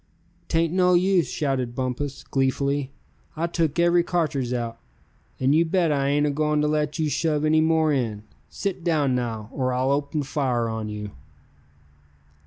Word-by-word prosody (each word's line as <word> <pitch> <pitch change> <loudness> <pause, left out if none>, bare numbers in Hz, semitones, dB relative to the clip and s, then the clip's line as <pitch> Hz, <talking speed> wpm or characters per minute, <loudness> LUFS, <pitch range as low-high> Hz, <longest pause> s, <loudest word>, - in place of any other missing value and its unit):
"'Tain't 165 0 +1
no 180 -1 +4
use!" 185 -1 +3
shouted 130 -5 -2
Bumpus, 130 +2 -3
gleefully. 140 +1 0 0.5
"I 165 - 0
took 165 -3 -1
every 175 0 +4
cartridge 155 -8 -1
out, 115 -2 -3 0.6
and 130 +2 +3
you 160 +2 +5
bet 170 -1 +1
I 140 -1 +1
ain't 145 +1 +2
agoin' 150 +1 +1
to 150 - +1
let 150 0 0
you 160 -2 0
shove 150 0 0
any 155 +1 +4
more 160 -1 +3
in. 110 -6 -2 0.3
Sit 190 -3 -4
down 150 -6 +1
now, 115 -3 -3
or 130 -2 -1
I'll 130 +2 +1
open 145 +1 -1
fire 130 -4 -1
on 110 -1 -4
you!" 105 -1 -6
145 Hz, 160 wpm, -24 LUFS, 130-160 Hz, 0.6 s, you